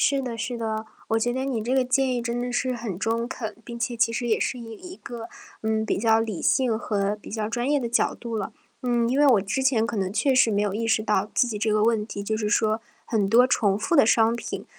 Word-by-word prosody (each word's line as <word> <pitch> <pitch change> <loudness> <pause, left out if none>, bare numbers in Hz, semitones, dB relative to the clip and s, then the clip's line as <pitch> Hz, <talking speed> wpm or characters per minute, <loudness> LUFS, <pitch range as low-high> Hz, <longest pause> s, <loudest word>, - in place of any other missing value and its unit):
是 275 -1 +2
的 240 -3 -5
是 240 +2 -3
的， 220 -1 -3 0.2
我 225 - +2
觉 240 +2 0
得 260 +1 -2
你 260 -5 -1
这 240 +4 -1
个 265 - +4
建 260 0 +1
议 240 - -2
真 235 0 -2
的 245 0 -3
是 255 +1 0
很 230 -6 -4
中 230 +4 -1
肯， 230 -3 -6
并 235 - -7
且 235 0 -2
其 230 0 +2
实 240 +1 -2
也 220 - +2
是 - - -1
以 235 -2 -9
一 360 +10 -10
个， 235 -9 -8 0.3
嗯， 220 0 0
比 - - -1
较 225 +1 +3
理 220 -6 -3
性 245 -4 +2
和 205 -2 -1
比 - - -11
较 215 -1 -2
专 240 +2 -1
业 290 -1 +2
的 240 - -2
角 235 - +1
度 235 -1 -5
了。 205 -3 -4 0.3
嗯， 240 -2 +1
因 260 +3 0
为 295 - +5
我 245 -7 +5
之 200 +7 -2
前 260 -4 +2
可 230 0 -3
能 190 -1 -1
确 270 +5 +2
实 245 -3 +4
没 205 0 +1
有 205 -2 0
意 225 +3 -2
识 220 -1 +2
到 210 -2 +1
自 245 - +3
己 215 -3 -4
这 215 +1 0
个 210 0 +2
问 220 -1 +2
题， 200 - -6
就 220 +2 -1
是 215 -1 -1
说 215 +1 +2 0.2
很 210 -4 0
多 235 +4 +6
重 210 -7 +2
复 270 +11 0
的 280 - +6
商 225 0 +4
品， - - -6
230 Hz, 290 characters per minute, -25 LUFS, 215-245 Hz, 0.3 s, 多